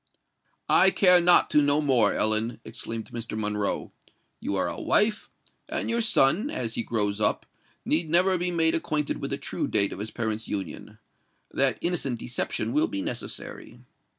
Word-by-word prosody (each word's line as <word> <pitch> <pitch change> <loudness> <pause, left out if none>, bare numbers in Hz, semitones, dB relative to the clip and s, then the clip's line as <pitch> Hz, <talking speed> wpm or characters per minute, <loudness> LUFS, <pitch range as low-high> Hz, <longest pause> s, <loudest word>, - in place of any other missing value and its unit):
"I 190 - +5
care 180 -2 +5
not 175 +1 +5
to 150 - +4
know 145 +1 +2
more, 130 -8 +3
Ellen!" 110 +2 0
exclaimed 110 0 -7
Mr. 115 -2 -6
Monroe. 105 -1 -3 0.5
"You 100 - -3
are 95 - 0
a 85 - -6
wife—and 210 +2 -2
your 235 0 0
son, 210 - +3
as 115 - -3
he - - -1
grows 105 -2 -2
up, 105 - +1 0.4
need 160 +1 0
never 180 +3 +4
be 180 +1 -1
made 165 -2 +2
acquainted 150 -2 -2
with - - -4
the - - -3
true - - -4
date 100 -2 +2
of - - -9
his 105 +2 -5
parents' 110 -1 -4
union. 95 -6 -6 0.5
That 135 -2 +2
innocent 165 -8 -2
deception 125 +2 -3
will 305 +3 +2
be 295 -3 -5
necessary." 300 - -6
135 Hz, 165 wpm, -25 LUFS, 110-175 Hz, 0.5 s, I